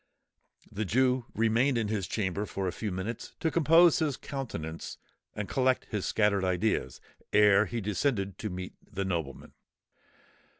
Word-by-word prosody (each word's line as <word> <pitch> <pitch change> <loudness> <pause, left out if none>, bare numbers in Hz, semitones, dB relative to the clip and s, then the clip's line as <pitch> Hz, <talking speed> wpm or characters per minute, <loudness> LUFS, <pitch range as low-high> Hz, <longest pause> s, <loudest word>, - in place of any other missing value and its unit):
The 110 - -2
Jew 125 +4 +2
remained 115 +4 +2
in 110 -2 0
his 105 -4 -2
chamber 95 -2 -2 0.2
a 95 -2 0
few 105 +2 -4
minutes 95 +5 -5
to 160 - 0
compose 165 +1 +5
his 150 -4 0
countenance, 95 - -6 0.4
and 100 -1 -3
collect 130 -1 +1
his 105 -4 -2
scattered 105 -2 +2
ideas, 95 +4 0 0.3
ere 105 0 +5
he 120 -1 -3
descended 100 -1 -1
to 110 - -3
meet 90 0 -6 0.2
the 100 0 -2
nobleman. 85 -7 -4
105 Hz, 140 wpm, -29 LUFS, 95-125 Hz, 0.4 s, compose